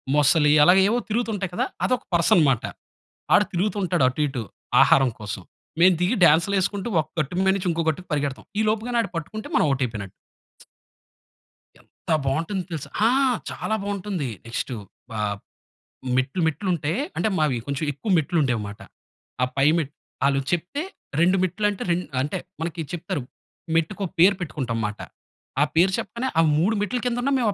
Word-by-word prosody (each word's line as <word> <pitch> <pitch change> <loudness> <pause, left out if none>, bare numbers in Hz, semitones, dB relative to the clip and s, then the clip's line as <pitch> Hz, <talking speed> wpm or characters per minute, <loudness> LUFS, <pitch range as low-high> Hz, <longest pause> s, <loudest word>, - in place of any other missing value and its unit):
మొసలి 150 +1 +4
అలాగే 185 +3 +6
ఏవో 235 +3 +2
తిరుగుతుంటాయి 215 -4 -1
కదా. - - +1 0.2
అదొక 255 -1 0
పర్సన్ 170 0 +4
మాట. 120 - -1 0.7
ఆడు 205 - +6
తిరుగుతూంటాడు 185 -3 0
అటు 130 +4 -3
ఇటు, 130 -4 -4 0.4
ఆహారం 135 -1 +5
కోసం. 105 -2 -5 0.4
మేం 185 +2 +7
దిగి, 180 +7 +2
డాన్స్‌‌లేసుకుంటూ, 190 +6 +2
ఒక 155 - -11
గట్టు 155 +3 -2
మీనుంచి 190 -1 +1
ఇంకో 165 0 -1
గట్టుకి 180 +4 -4
పరిగెడతాం. 145 -2 -2 0.2
ఈలోపుగానాడు 225 +2 0
పట్టుకుంటే, 215 +7 -5
మనం - - +4
ఔట్ 135 0 -1
అయిపోయినట్టు. 105 -5 -6 1.7
ఎంత - - -19 0.2
బావుంటుంది 165 +8 -1
తెలుసా? 160 -4 -5 0.2
ఆ! - - +4 0.4
చాలా 220 - -2
బావుంటుంది. 200 -7 -3 0.2
నెక్స్టు, 120 +2 -3 0.4
ఆహ్, 105 -1 -1 0.8
మెట్లు 135 +7 0
మెట్లుంటే, 160 -1 -1 0.2
అంటే - - +1
మావి 150 -6 +1
కొంచెం 140 +3 -2
ఎక్కువ 145 +10 -5
మెట్లుండేవిమాట. 130 - -1 0.6
ఆ - - +6
పై 135 +1 +4
మెట్ 150 -3 -2 0.3
ఆళ్ళు 140 0 +2
చెప్తే, 175 - -1 0.4
2 180 +3 +4
మెట్లంటే, 205 +2 -1
రెండ్ 175 +1 0 0.2
అంటే 145 - -2 0.2
మనకి 165 0 -3
చెప్తారు. 170 -4 -3 0.5
మెట్టుకో 165 +5 0
పేరు 185 +4 +7
పెట్టుకుంటాంమాట. 115 -10 -3 0.6
ఆ - - +7
పేరు 180 +4 +4
చెప్పగానే, 245 +3 -3
ఆ - - +5 0.2
3 195 +8 +2
మెట్ల 210 +5 -1
కిందున్నా, 245 +3 0
మేము 230 - +2
170 Hz, 140 wpm, -24 LUFS, 140-200 Hz, 1.7 s, మేం